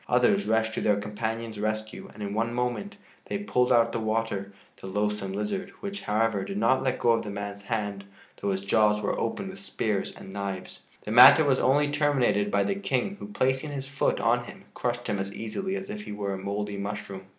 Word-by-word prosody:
Others 125 +12 +3
rushed 110 0 +2
to - - -2
their 105 -1 +2
companion's 110 +1 -4
rescue 110 +1 -3
and 105 - -8
in 100 0 -3
one 115 +2 -1
moment 125 - -2 0.3
they - - -2
pulled 125 - +1
out 120 -2 +6
of 115 - -7
the 115 - -2
water 110 -3 -1 0.3
the - - -7
loathsome 105 0 -1
lizard, 105 - -2
which, 200 0 -5
however, 110 -1 +1
did 195 - -5
not 130 -10 +3
let 130 -1 0
go 120 - +3
of 115 -1 +2
the 105 - -6
man's 100 0 -5
hand 105 -3 -3 0.3
though 100 - -2
his 95 0 -2
jaws 105 +1 +3
were 100 - -1
opened 190 - -2
with 195 - -11
spears 110 - -2
and 95 - -11
knives. 100 -2 -5 0.2
The 105 - -5
matter 125 +7 +10
was 135 -2 +3
only 145 +2 +3
terminated 140 -8 +2
by 100 -1 +2
the - - 0
King 195 -1 -1
who, - - -7
placing 130 -6 0
his 135 -1 -5
foot 145 -1 0
on - - +2
him, - - -11
crushed 120 0 -2
him 100 - -1
as 100 +1 -4
easily 190 - -3
as 195 +1 -5
if 210 0 -5
he - - -8
were 100 -1 -3
a - - -3
mouldy 100 +1 -3
mushroom. 100 -1 -5
110 Hz, 215 wpm, -27 LUFS, 100-130 Hz, 0.3 s, matter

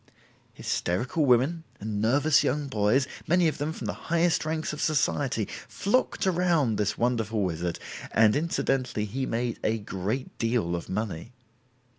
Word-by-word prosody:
Hysterical 125 - -1
women 135 +7 +3 0.2
and 105 0 -3
nervous 145 +7 +4
young 145 +2 0
boys, 115 +2 +2 0.2
many 175 0 +4
of 155 - -2
them 150 +2 -1
from - - -7
the - - -2 0.2
highest 170 -1 +2
ranks 155 -1 -2
of 150 - -5
Society, 140 -6 +1 0.2
flocked 215 +2 0
around 170 - +2
this 105 0 0
wonderful 115 -3 0
wizard, 85 -1 -2 0.3
and 110 -1 +5
incidentally 135 -7 0
he 130 +6 -3
made 120 0 -2
a 110 +1 +1
great 105 +4 -4
deal 115 -7 +1
of 85 - -6
money. 105 +1 -4
125 Hz, 145 wpm, -27 LUFS, 105-155 Hz, 0.3 s, and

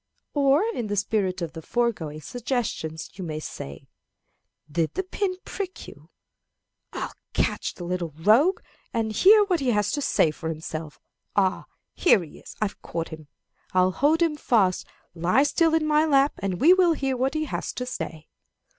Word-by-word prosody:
Or, 285 +3 +4
in 235 - -3
the 205 - -2
spirit 195 -3 0
of 160 -2 -5
the 165 - -7
foregoing 165 -9 -1
suggestions, 225 - -3
you - - -3
may 155 -3 -4
say, 70 - -8 0.9
"Did 160 +1 -1
the 380 - 0
pin 375 0 -2
prick 380 -2 -6
you? - - -14 0.8
I'll - - -5 0.2
catch - - -1
the 175 - -8
little 175 -1 -2
rogue, 230 - +4 0.3
and 225 -1 0
hear 415 - +6
what 370 -4 +1
he 270 -3 0
has 210 -3 +1
to 290 - -1
say 165 - +3
for 160 +2 -6
himself. 155 -1 -6 0.4
Ah, 190 -2 +1 0.3
here 215 - +4
he 155 - -13
is - - -12
I've 210 -2 -3
caught 165 -1 -4
him! 155 -2 -10 0.5
I'll 185 0 +4
hold 300 - +3
him 310 -3 0
fast. 200 -10 +2 0.3
Lie 180 +10 +3
still 325 +2 +2
in 320 -1 +1
my 305 0 +3
lap, 275 -1 +4
and 190 -3 -2
we 335 +6 +7
will 365 -3 +4
hear 270 -3 -1
what 265 +4 0
he 310 0 0
has - - -3
to 250 - -4
say. 160 -10 -6
220 Hz, 175 wpm, -25 LUFS, -, 0.9 s, we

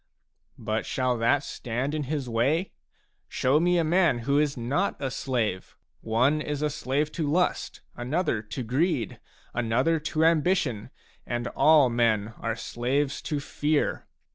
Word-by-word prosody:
But 110 +1 -2
shall 130 -2 0
that 130 +5 +2
stand 125 +4 -3
in 150 -2 -2
his 140 -1 -3
way? 135 +10 +1 0.6
Show 130 +4 +2
me 175 +1 +3
a 170 - +3
man 170 -3 +3
who 140 +1 +3
is 145 -2 0
not 140 +12 -1
a 135 -2 -2
slave; 115 -10 -2 0.2
one 130 +7 +2
is 150 -1 -3
a 150 - +1
slave 145 +1 -1
to 155 -3 -2
lust, 180 +4 0
another 125 -1 -1
to 110 +4 -6
greed, 130 - 0 0.3
another 120 +8 +1
to 155 +1 0
ambition, 155 - +1 0.4
and 120 0 -2
all 150 -5 +5
men 115 -2 +1
are 115 -1 -2
slaves 135 +5 -1
to 150 -2 -2
fear. 145 +1 -1
140 Hz, 145 wpm, -27 LUFS, 120-155 Hz, 0.6 s, all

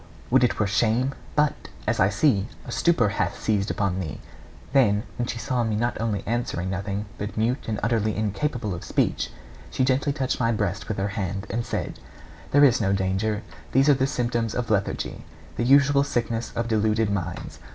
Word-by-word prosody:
Would - - +5
it 125 - +2
were 105 - +2
shame; 115 +6 +1 0.2
but, 150 0 +1 0.2
as - - 0
I 95 - +5
see, 105 -2 +2 0.2
a - - -7
stupor 165 -11 +3
hath 105 - -1
seized 105 -2 0
upon 95 -2 0
thee.' 80 -7 -5 0.5
Then, 105 -7 +4 0.2
when 120 - 0
she 120 - -3
saw 125 0 0
me 110 -2 0
not 120 +1 -1
only 105 -4 -1
answering 110 -6 -2
nothing, 100 +2 -3
but 105 0 -5
mute 120 +5 0
and 110 -2 -1
utterly 110 -2 +1
incapable 110 +1 -1
of 85 - -6
speech, - - 0 0.4
she 130 - +1
gently 135 +2 +2
touched 135 -3 -1
my 115 -2 +2
breast 105 -4 -1
with 110 - -3
her 100 +1 0
hand, 100 -1 -3
and 115 +3 -1
said: - - -4 0.5
'There 145 +1 +5
is 120 -4 +4
no 100 -2 +2
danger; 100 +3 0 0.3
these 135 +3 +5
are - - +8
the 135 0 +1
symptoms 120 -4 -1
of 120 -2 -2
lethargy, 100 -2 -1 0.3
the - - -1
usual 140 +1 +5
sickness 115 -3 -2
of 115 0 -1
deluded 110 -1 +2
minds. 90 -3 -4
110 Hz, 190 wpm, -25 LUFS, 100-125 Hz, 0.5 s, are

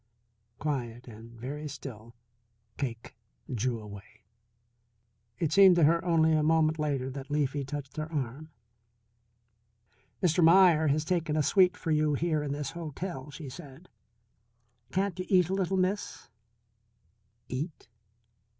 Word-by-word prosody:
Quiet 125 -5 -4
and 115 +1 -12
very 145 +5 -5
still, 120 -6 -9 0.6
Cake 115 -5 -5 0.4
drew 120 0 -1
away. 105 0 -12 1.1
It 155 +1 -1
seemed 190 +1 +7
to 170 - +3
her 165 +3 +4
only 160 -2 +3
a 155 - +3
moment 155 0 +2
later 140 -3 -1
that 135 +1 -8
Leafy 145 -1 0
touched 135 0 -7
her 155 +1 -4
arm. 145 +1 -4 1.7
"Mr. 175 0 +3
Meier 165 -2 +6
has 150 +2 +1
taken 165 -3 0
a 155 - +2
suite 185 +4 +4
for 165 - -3
you 150 -1 +2
here 155 0 0
in 145 -1 -3
this 145 +2 -3
hotel," 165 -2 -6
she 150 0 -9
said. 135 +5 -11 1.0
"Can't 190 -1 -1
you 185 - -3
eat 180 -3 +4
a - - -1
little, 190 0 0
Miss?" 185 -7 -2 1.2
Eat? 150 +6 -5
150 Hz, 130 wpm, -29 LUFS, 135-170 Hz, 1.7 s, seemed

